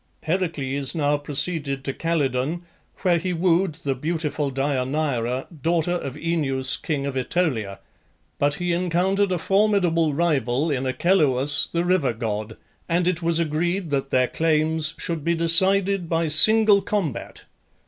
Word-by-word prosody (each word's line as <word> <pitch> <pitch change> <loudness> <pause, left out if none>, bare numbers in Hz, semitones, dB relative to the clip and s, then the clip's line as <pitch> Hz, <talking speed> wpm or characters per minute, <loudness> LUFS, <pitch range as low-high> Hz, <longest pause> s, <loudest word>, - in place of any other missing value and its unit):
Heracles 155 -5 -2
now 145 -2 +1
proceeded 145 -1 -2
to 135 - -3
Calydon, 155 0 -2 0.4
where 175 -3 +2
he 180 +2 -3
wooed 175 0 +1
the 140 - -1
beautiful 150 0 -3
Deianeira, 130 -2 -2 0.2
daughter 170 +2 0
of 145 -7 -4
Oeneus, 145 -5 -1
king 145 -3 -4
of 140 - -3
AEtolia; 125 - -2 0.6
but 145 0 +1
he 175 +2 -2
encountered 185 +3 0
a 180 - 0
formidable 180 -5 +1
rival 145 -3 0
in 130 -1 -2
Achelous, 145 -2 +1
the 170 +1 -1
river 175 -9 +1
god, 110 -1 -5 0.3
and 175 +1 +1
it 180 -2 0
was 165 -1 +2
agreed 170 +2 -2
that 135 -1 -2
their 125 -1 +2
claims 155 0 0
should 165 -4 -4
be 170 +2 0
decided 185 +2 +4
by 165 0 0
single 210 +6 +7
combat. 170 - -4
160 Hz, 140 wpm, -22 LUFS, 140-175 Hz, 0.6 s, single